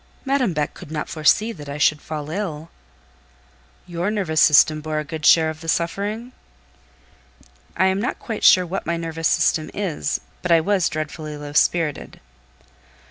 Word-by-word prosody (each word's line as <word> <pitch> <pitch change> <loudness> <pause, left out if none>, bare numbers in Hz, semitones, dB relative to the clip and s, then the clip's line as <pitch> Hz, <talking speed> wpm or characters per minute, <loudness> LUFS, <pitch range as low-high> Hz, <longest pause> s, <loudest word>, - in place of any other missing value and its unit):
"Madame 270 -6 +1
Beck 150 -3 -2
could - - -12
not 155 -1 -4
foresee 170 +8 +2
that 150 -9 -10
I 140 - -5
should 150 0 +2
fall 155 -1 -6
ill." 165 -4 -5 1.1
"Your 175 +2 -3
nervous 185 -7 0
system 155 0 +5
bore 155 0 -3
a 155 - -1
good 155 +1 -3
share 160 -1 +5
of 155 0 -12
the 165 - -9
suffering?" 205 +9 -2 1.5
"I 190 - +3
am 190 +1 +1
not 250 - -2
quite 225 -3 -6
sure 185 -1 +6
what 185 +3 -5
my 170 0 0
nervous 165 -1 -2
system 165 -2 +1
is, 170 -6 -2 0.2
but 180 - -2
I 165 - +6
was 185 +1 +1
dreadfully 155 -1 -5
low 145 0 -8
spirited." 155 0 0
165 Hz, 165 wpm, -21 LUFS, 155-190 Hz, 1.5 s, sure